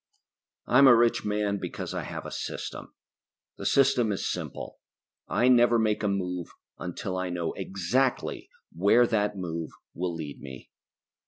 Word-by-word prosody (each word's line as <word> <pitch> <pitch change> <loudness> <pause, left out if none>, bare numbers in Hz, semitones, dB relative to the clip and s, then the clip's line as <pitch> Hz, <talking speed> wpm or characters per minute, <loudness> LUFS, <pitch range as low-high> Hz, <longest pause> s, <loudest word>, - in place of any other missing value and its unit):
I'm 140 - +6
a 125 - +9
rich 115 -1 +2
man 105 -1 0
because - - -5
I - - -2
have - - -6
a - - -6
system. - - -6 0.6
The - - -2
system 130 -5 +3
is 100 - -2
simple: - - -6 0.5
I 125 - +2
never 120 -2 +5
make 110 -2 +1
a 105 - 0
move 90 -3 -2 0.3
until 90 +2 -4
I 90 0 -2
know 85 -2 -2
exactly 100 +8 -1 0.3
where 100 +8 +5
that 105 -3 0
move 85 -3 -4 0.2
will 90 0 -3
lead 75 -3 -7
me. 65 -2 -10
100 Hz, 150 wpm, -27 LUFS, 90-120 Hz, 0.6 s, a